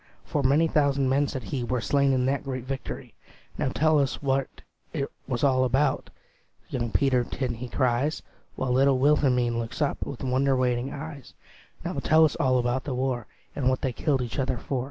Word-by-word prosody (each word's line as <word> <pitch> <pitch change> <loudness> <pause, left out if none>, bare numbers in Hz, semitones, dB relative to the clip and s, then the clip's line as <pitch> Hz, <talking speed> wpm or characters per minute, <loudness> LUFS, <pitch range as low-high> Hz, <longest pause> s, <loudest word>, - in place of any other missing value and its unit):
For 145 - -1
many 140 +5 +4
thousand 140 -3 +2
men," 140 +2 +2
said 130 -3 -5
he, 120 +5 -3
"Were 125 +1 -1
slain 140 +3 +2
in 130 -1 +2
that 140 +2 0
great 130 -3 -4
victory." 135 +1 -6 0.5
"Now - - +1
tell 155 +3 +3
us 140 -2 0
what 135 -1 0 0.5
't 140 -3 0 0.2
was 125 -1 -2
all 130 -2 +4
about," 135 +2 +1 0.6
Young 120 -2 -1
Peterkin 125 0 +1
he 120 +2 -7
cries; 130 +4 0 0.3
While 130 -1 -2
little 135 +1 +4
Wilhelmine 130 -4 +3
looks 115 -1 -5
up 145 -3 0
With 135 - -6
wonder 130 +1 +2
waiting 125 +1 0
eyes; 145 -2 -8 0.5
"Now - - -2
tell 160 +1 +5
us 150 - 0
all 130 -1 +2
about 125 +1 0
the 135 - -3
war, 125 -3 -1 0.3
And 130 -3 +1
what 130 - 0
they 130 - -1
killed 135 -3 0
each 120 +3 -5
other 130 -1 0
for." 130 +3 -3
130 Hz, 190 wpm, -26 LUFS, 125-140 Hz, 0.6 s, tell